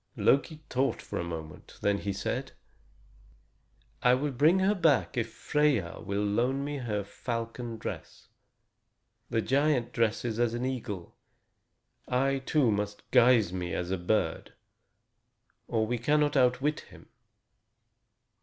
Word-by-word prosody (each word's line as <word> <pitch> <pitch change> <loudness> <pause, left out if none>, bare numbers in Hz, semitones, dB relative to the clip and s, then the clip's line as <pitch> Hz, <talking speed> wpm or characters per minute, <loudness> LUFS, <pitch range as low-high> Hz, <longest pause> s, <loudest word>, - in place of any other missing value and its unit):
Loki 155 +3 +2
thought 130 +2 0
for - - -5
a - - -1
moment. 80 -3 -8
Then 100 0 +2
he 100 - -2
said: 95 - -3 1.5
"I 125 0 +5
will 145 +3 -1
bring 150 +8 +4
her 190 +2 +3
back 160 -7 +2
if 115 -2 -1
Freia 140 -10 0
will 100 +1 -1
loan 125 +7 +1
me 145 0 -3
her 105 -5 -2
falcon 115 +2 -5
dress. - - -7 1.0
The 115 - 0
giant 135 -3 +1
dresses 115 0 0
as 120 -1 +1
an 120 +1 -2
eagle. 110 -9 -5 0.9
I, 135 +2 +1
too, 130 -2 +2
must 105 0 -3
guise 120 -7 +5
me 90 -1 -3
as 90 +1 -3
a 95 - 0
bird, 90 -2 -1 1.1
or 110 -1 +1
we 120 +2 -2
cannot 150 +4 +2
outwit 135 +3 +2
him." - - -15
120 Hz, 130 wpm, -29 LUFS, 105-135 Hz, 1.5 s, I